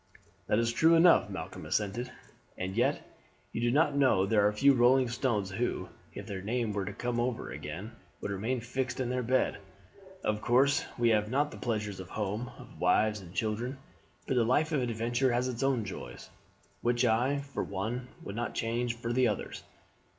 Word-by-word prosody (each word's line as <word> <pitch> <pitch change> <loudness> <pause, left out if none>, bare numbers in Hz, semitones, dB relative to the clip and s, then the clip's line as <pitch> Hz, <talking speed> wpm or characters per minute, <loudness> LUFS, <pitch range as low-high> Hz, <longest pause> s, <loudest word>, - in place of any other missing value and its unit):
"That - - +2
is 115 0 +1
true 165 +6 +5
enough," 170 +1 +6
Malcolm - - -6
assented; 110 +4 -1 0.5
"and 95 +1 -4
yet 120 - +1 0.5
do - - -2
you 120 0 +2
know 140 - +3
there 105 0 +4
are - - +2
few 140 +7 +5
rolling 130 +1 +4
stones 115 -5 -1
who, 115 +5 -2 0.3
if - - -6
their 95 -2 -5
time 115 +1 -1
were 100 -1 -2
to - - -4
come 120 -1 -2
over 120 0 -2
again, 105 +6 -6 0.3
would 100 - -4
remain 115 +6 -1
fixed 125 +1 -3
in 125 -2 -1
their 125 0 0
bed. 125 -1 +1 0.6
Of 105 0 0
course 135 +4 +3
we 120 -1 +3
have 105 -1 +2
not 145 +4 +1
the - - -9
pleasures 105 -5 -2
of 95 -1 -8
home, 105 +3 -3
of - - -13
wives 105 +4 +3
and 90 -3 -12
children; 115 +7 -2 0.5
but - - -1
the 125 -2 +3
life 145 +7 +2
of 145 -4 +1
adventure 120 +2 0
has 125 +1 +1
its 125 -1 -4
own 135 -5 +1
joys, - - -8 0.5
which 120 +1 +2
I, 120 +5 +2 0.2
for - - -1
one, 110 +6 -3 0.2
would 100 - -6
not 120 +1 -3
change 115 +1 -1
for 120 0 -3
the 125 0 +4
others. - - -3
120 Hz, 185 wpm, -30 LUFS, 105-125 Hz, 0.6 s, enough